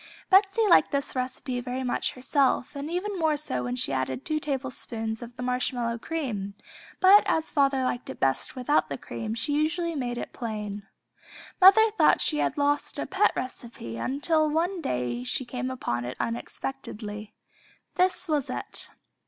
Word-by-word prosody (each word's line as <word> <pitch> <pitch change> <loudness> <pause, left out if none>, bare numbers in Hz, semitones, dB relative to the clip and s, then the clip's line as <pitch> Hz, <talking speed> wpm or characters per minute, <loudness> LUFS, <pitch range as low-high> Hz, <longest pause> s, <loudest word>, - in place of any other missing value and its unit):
Betsey 395 +3 +5
liked 360 - +6
this 280 -1 -2
recipe 255 0 -3
very 250 +1 -4
much 250 - 0
herself, 265 +2 +1
and 285 +2 -5
even 370 +3 -3
more 315 -2 +2
so 130 - -2
when 125 0 -2
she 135 +2 0
added 130 -1 -2
two 310 0 0
tablespoons 255 -6 -4
of 240 0 -9
the 250 - -6
marshmallow 250 -2 -1
cream, 225 -11 -4 0.4
but 395 +3 +8
as 320 0 0
father 275 -2 +2
liked 255 0 -2
it - - -7
best 135 0 +1
without 260 +4 +1
the - - -3
cream 225 -1 -5
she 290 +6 -2
usually 325 +3 0
made 245 -5 -3
it - - -6
plain. 210 -3 -5 0.7
Mother 425 +4 +8
thought - - +5
she 300 - +3
had - - 0
lost 290 0 0
a - - -2
pet - - +3
recipe 235 - -6
until 305 - +1
one 340 +4 0
day 125 - -2
she 255 - +1
came 250 +1 -4
upon 120 - -3
it 125 +1 -6
unexpectedly. 215 -3 -5 0.6
This 370 0 +1
was 300 -4 0
it. - - -6
260 Hz, 165 wpm, -27 LUFS, 225-310 Hz, 0.7 s, but